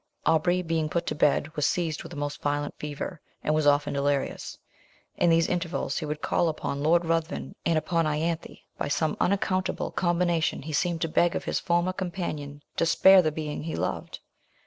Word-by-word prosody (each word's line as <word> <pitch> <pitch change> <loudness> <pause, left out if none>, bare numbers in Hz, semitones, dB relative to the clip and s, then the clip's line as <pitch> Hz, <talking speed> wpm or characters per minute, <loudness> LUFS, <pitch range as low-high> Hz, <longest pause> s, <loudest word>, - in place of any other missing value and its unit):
Aubrey 175 +3 +3
being 160 -2 0
put 170 +1 -1
to - - -1
bed 150 +1 +1
was 150 -1 +2
seized 165 -3 -1
with - - -10
a - - -7
most 145 0 -4
violent 145 0 -1
fever, 150 +3 -5 0.2
and 155 - +1
was 155 -1 +2
often 145 0 +3
delirious; 140 0 -1 0.6
in 175 - +3
these 165 0 +4
intervals 175 -1 -1
he 155 - -4
would 150 0 -4
call 175 -2 +2
upon 140 -2 -3
Lord 170 +3 +3
Ruthven 165 0 -1
and 165 -1 +3
upon 165 +1 +1
Ianthe 160 +2 -2 0.2
by - - -1
some 155 +1 0
unaccountable 185 -1 0
combination 175 -4 +1
he 155 +1 -6
seemed 170 +2 0
to - - +1
beg 170 +2 +2
of - - -2
his - - 0
former 175 +2 +1
companion 165 -6 -4
to - - +3
spare 190 +3 +7
the 155 -3 0
being 150 -1 -4
he 160 +1 -4
loved. - - -3
160 Hz, 190 wpm, -27 LUFS, 150-175 Hz, 0.6 s, spare